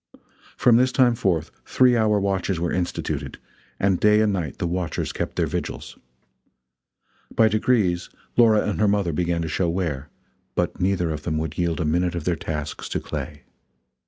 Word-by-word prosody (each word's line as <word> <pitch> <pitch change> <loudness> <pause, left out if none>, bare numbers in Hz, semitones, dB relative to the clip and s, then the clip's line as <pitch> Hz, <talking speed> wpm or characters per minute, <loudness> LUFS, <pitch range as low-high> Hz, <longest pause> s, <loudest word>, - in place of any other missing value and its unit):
From 120 -2 +5
this 130 +1 +3
time 125 -2 +4
forth 95 -9 -1
three 125 -1 +3
hour 110 -2 +3
watches 95 -2 -1
were 85 0 -1
instituted, 90 -1 -3 0.4
and 95 -2 +2
day 105 0 +5
and 105 -2 +2
night 85 -7 -3
the - - -2
watchers 85 0 -2
kept - - -4
their - - +1
vigils. - - -5 1.4
By 110 - +5
degrees 105 -5 +1 0.3
Laura 110 -3 +4
and 105 - -2
her 105 - +3
mother 100 -5 +1
began 85 0 0
to - - -3
show 85 +2 0
wear, 80 -5 -2 0.5
but - - -1
neither 90 -3 +1
of 75 -1 -4
them 80 0 -2
would 80 0 -3
yield 85 -1 -1
a 85 - 0
minute 85 +3 +1
of 85 - -3
their 85 +1 0
tasks 75 -2 -5
to - - -1
Clay. 75 -1 -6
90 Hz, 175 wpm, -23 LUFS, 85-105 Hz, 1.4 s, From